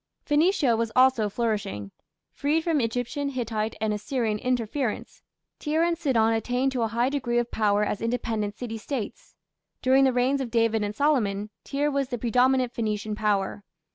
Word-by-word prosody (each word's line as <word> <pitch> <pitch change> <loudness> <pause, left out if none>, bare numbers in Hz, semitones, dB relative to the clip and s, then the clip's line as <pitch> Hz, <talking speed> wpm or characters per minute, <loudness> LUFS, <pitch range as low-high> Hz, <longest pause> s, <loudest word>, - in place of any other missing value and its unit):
Phoenicia 295 -4 +3
was 225 0 -1
also 255 -4 +4
flourishing. 200 - -2 0.4
Freed 300 +3 0
from 320 -4 +1
Egyptian, 245 +5 -2
Hittite, 225 -4 -2
and 215 -1 0
Assyrian 215 0 -1
interference, 250 0 -2 0.4
Tyre 315 +2 +1
and 340 0 +2
Sidon 240 -9 +2
attained 245 +4 0
to 255 -2 -2
a 225 - +2
high 235 +3 +1
degree 255 -4 -1
of 240 0 0
power 210 -1 +2
as 210 - -2
independent 225 -3 -2
city 225 -3 -5
States. 240 -2 -6 0.5
During 265 +1 +5
the 265 - +4
reigns 255 +3 +1
of 255 - -3
David 225 -2 +2
and 205 0 -3
Solomon, 215 -8 +1
Tyre 290 +1 -1
was 275 -2 -1
the 245 - -2
predominant 250 +2 +2
Phoenician 215 -1 -2
power. 205 -1 -1
240 Hz, 165 wpm, -26 LUFS, 215-270 Hz, 0.5 s, During